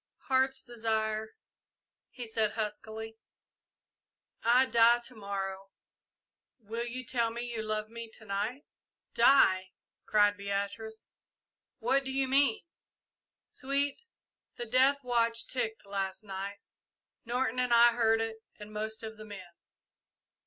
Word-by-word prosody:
"Heart's 265 0 +2
Desire," 220 -2 -2 0.7
he 245 - -7
said 220 -2 0
huskily, 220 +1 -5 1.2
"I 245 +3 +5
die 235 -1 +6
to 250 - -3
morrow 195 -2 -5 0.9
will 230 +1 -5
you 255 +2 -5
tell 235 -2 +1
me 235 +1 -5
you 225 - -2
love 215 0 -2
me 230 0 -8
to 220 - -12
night?" 210 +7 -3 0.5
"Die!" 190 -7 +5 0.3
cried 205 -1 +4
Beatrice. 200 +2 -3 0.7
"What 265 +4 +2
do 265 - -4
you 265 0 0
mean?" 270 -3 +3 0.8
"Sweet, 280 - -1 0.5
the 240 - -5
death 260 +4 +3
watch 230 -2 +1
ticked 225 -4 -3
last 195 0 -3
night 200 0 -5 0.7
Norton 250 0 -1
and 250 -1 +1
I 235 0 +8
heard 225 -1 +3
it 225 0 -3 0.2
and 210 0 -10
most 220 +1 -3
of 220 0 -7
the 215 - -10
men. 190 -4 -10
225 Hz, 125 wpm, -31 LUFS, 210-245 Hz, 1.2 s, I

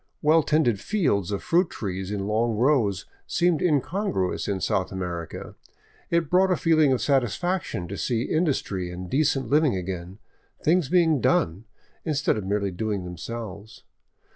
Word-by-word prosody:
Well 155 +2 +5
tended 145 -9 +2
fields 120 - 0
of 100 - -3
fruit 175 +1 +2
trees 95 -2 -4
in 100 -1 -3
long 110 +2 +1
rows 115 - +2 0.2
seemed 170 -3 +1
incongruous 160 - 0
in 100 -2 -1
South 95 0 -1
America; 90 -3 -5 0.6
it 170 -2 +1
brought 185 +4 +3
a 185 - +2
feeling 155 -4 +3
of 130 - +2
satisfaction 140 - 0
to 100 +3 -6
see 120 -2 0
industry 130 - -1
and 90 0 -7
decent 140 -2 +1
living 150 -5 +3
again, 90 0 -5 0.5
things 165 -3 +2
being 165 -6 +3
done, 90 +4 +1 0.4
instead 150 -3 +1
of 105 -3 -4
merely 100 -1 0
doing 100 +1 -2
themselves. 100 +4 -8
115 Hz, 145 wpm, -25 LUFS, 95-155 Hz, 0.6 s, Well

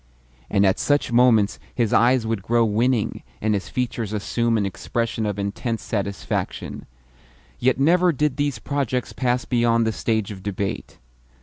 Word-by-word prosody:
And 100 - +3
at 95 - +2
such 145 -3 +1
moments 115 -4 +4 0.2
his 115 -4 +1
eyes 120 0 +4
would 110 -3 -1
grow 115 +3 +2
winning, 115 +1 0 0.2
and 110 0 +1
his 100 -2 -2
features 115 -4 -2
assume 115 +2 0
an 100 - 0
expression 110 +3 -2
of 105 -1 -2
intense 105 +3 -3
satisfaction. 100 -2 -3 0.7
Yet 130 +1 +2
never 175 +5 +4
did 150 -2 0
these 145 -4 0
projects 130 0 -2
pass 125 -1 0
beyond 115 -2 +2
the 110 - +1
stage 110 -2 -1
of 95 -2 -8
debate. 100 0 -4
115 Hz, 150 wpm, -23 LUFS, 105-125 Hz, 0.7 s, moments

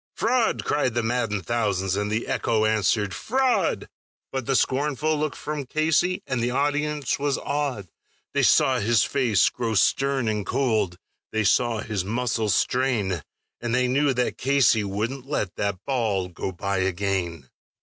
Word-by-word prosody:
"Fraud!" 250 -3 +1
cried 130 -5 0
the 120 - +1
maddened 115 -3 -1
thousands, 95 -5 0
and 105 +1 -1
the 110 +2 -1
echo 110 -1 0
answered, 105 -2 +1
"Fraud!" 260 +1 0 0.4
But 130 -3 -4
the 135 - +2
scornful 150 +4 +1
look 150 -1 -2
from 150 -3 -5
Casey, 160 +5 +1
and 130 -2 -2
the 120 - +1
audience 145 +1 0
was 140 -1 0
awed; 140 -9 -2 0.5
They - - +2
saw - - +4
his 110 +1 +3
face 125 -8 +2
grow 115 -3 -3
stern 135 +4 +2
and 105 -1 0
cold, 105 -6 0 0.3
they 110 0 0
saw 115 +2 +2
his 105 -4 -2
muscles 110 -1 0
strain, 115 - 0 0.4
And 120 0 -1
they 125 0 +2
knew 140 +3 +2
that 125 0 -1
Casey 130 -5 +3
wouldn't 115 +7 -3
let 105 -11 -2
that 100 -1 -2
ball 110 -9 0
go 90 +2 -4
by 100 +2 -2
again. 90 -6 -2
120 Hz, 155 wpm, -24 LUFS, 100-140 Hz, 0.5 s, saw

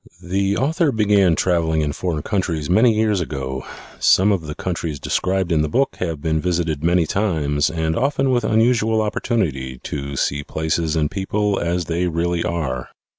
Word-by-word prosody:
The 95 +2 -1
author 155 +4 +1
began 100 -6 +3
traveling 80 -3 +1
in 75 -1 -1
foreign 80 -3 -3
countries 85 -7 -1
many 110 +4 +5
years 105 -3 +1
ago. 65 -4 -4 0.4
Some 100 +3 +4
of 85 -6 -1
the 75 - -5
countries 85 -5 -3
described 95 +3 -1
in 80 -2 +3
the 75 - -1
book 135 - 0
have 85 -4 -2
been 80 -1 0
visited 85 -4 -1
many 85 0 +3
times 75 -7 0
and 80 0 -1
often 135 - +1
with 120 -2 +1
unusual 110 0 +2
opportunity 85 - -1
to 70 -1 -5
see 70 +2 -1
places 80 +1 -1
and 75 -1 0
people 100 +1 -1
as 85 0 -1
they 85 +3 -1
really 85 +1 -1
are. 65 -7 -3
85 Hz, 170 wpm, -20 LUFS, 80-105 Hz, 0.4 s, many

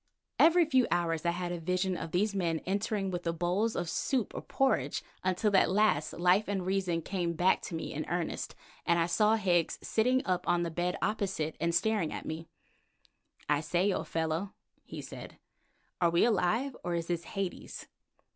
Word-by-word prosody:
Every 335 +1 +6
few 260 -5 +3
hours 170 -1 0
I - - +5
had 175 0 -2
a 175 - -3
vision 185 +2 0
of 165 - -5
these 200 +4 +1
men 170 -4 0
entering 200 0 -1
with 175 -1 -3
the 170 - -1
bowls 180 +7 0
of 175 - -2
soup 245 - -1
or - - -5
porridge, 270 -1 0 0.2
until 185 +3 +1
at - - +5
last 185 -7 +2
life 180 +4 +3
and 195 -2 -2
reason 185 -3 0
came 175 -2 -2
back 180 +3 +3
to 170 - -5
me 160 - -4
in 155 +1 -4
earnest, 175 -1 -3 0.3
and 170 - +2
I 165 - +3
saw 210 +5 +3
Higgs 180 -6 +1
sitting 250 +4 +2
up 180 -2 -1
on 175 0 +2
the 170 - -3
bed 175 +2 -1
opposite 190 -7 -1
and 170 0 +1
staring 205 -3 +1
at - - -6
me. 160 +1 -5 1.0
"I 150 -1 +3
say, 180 +5 +1
old - - -3
fellow," 165 +4 -2 0.3
he - - -8
said, - - -9 0.6
"are 170 - +5
we 170 +4 +4
alive, 235 +5 +1
or 175 -1 -1
is 170 -1 -2
this 170 -1 -2
Hades?" 195 +1 -5
180 Hz, 185 wpm, -31 LUFS, 170-205 Hz, 1.0 s, Every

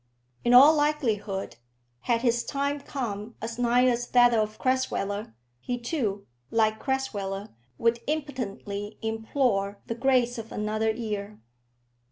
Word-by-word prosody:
In 240 +1 +5
all 280 +5 +10
likelihood, 230 - -1 0.4
had 230 - 0
his 240 -1 +2
time 280 +1 -1
come 225 -5 -5
as 230 +2 -5
nigh 245 +1 +4
as 245 -1 +1
that 245 -1 +5
of 215 -1 0
Crasweller, 210 - -1 0.2
he 245 - -3
too, 235 -6 -2 0.2
like 220 -1 +2
Crasweller, 205 -7 -2 0.3
would 230 0 +2
impotently 225 -8 -4
implore 220 -2 0
the - - -3
grace 245 -1 +2
of 225 0 -8
another 215 +1 -1
year. 210 -2 -4
230 Hz, 125 wpm, -27 LUFS, 210-255 Hz, 0.4 s, all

